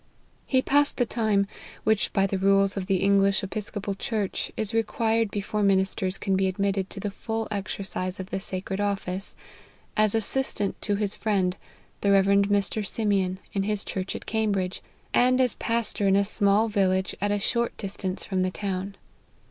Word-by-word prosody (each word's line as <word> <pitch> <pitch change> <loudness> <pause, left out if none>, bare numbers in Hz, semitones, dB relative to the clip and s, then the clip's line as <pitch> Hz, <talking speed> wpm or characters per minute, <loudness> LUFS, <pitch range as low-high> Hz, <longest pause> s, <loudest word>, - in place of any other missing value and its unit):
He 260 -1 +3
passed 290 +1 +3
the 245 - +2
time, 215 -4 +1 0.4
which, 220 -1 +2
by 195 -1 +2
the 195 -1 -1
rules 195 0 +4
of 190 -2 -3
the 195 - +2
English 195 0 +3
Episcopal 205 0 -3
church, 205 0 -2
is 220 -1 -2
required 225 0 +1
before 210 +1 -2
min 195 -2 +4
isters 190 0 -3
can 195 -2 0
be 190 0 +2
admitted 195 0 -1
to 195 - -8
the 205 +1 -3
full 225 +2 -3
exercise 190 -2 -3
of 190 0 -7
the - - -1
sacred 190 +1 -4
office, 195 -2 -2 0.6
as 215 -1 +3
assistant 220 -2 0
to 205 - 0
his 205 0 0
friend, 190 -4 0 0.5
the 200 - +3
Rev 195 -1 +5
Mr. 200 +1 +2
Simeon, 195 -3 0 0.2
in 195 - 0
his 210 0 -1
church 190 0 -3
at - - -7
Cambridge, 200 -4 -1 0.3
and 255 +1 +4
as 250 -3 +3
pastor 230 -3 -1
in 195 - +4
a 200 0 +3
small 205 +1 +3
village 190 -3 +1
at 205 - +1
a 205 - +2
short 235 +3 -1
distance 195 -2 -3
from 190 -2 -1
the 185 - +1
town. 195 0 -4
200 Hz, 175 wpm, -26 LUFS, 195-215 Hz, 0.6 s, Rev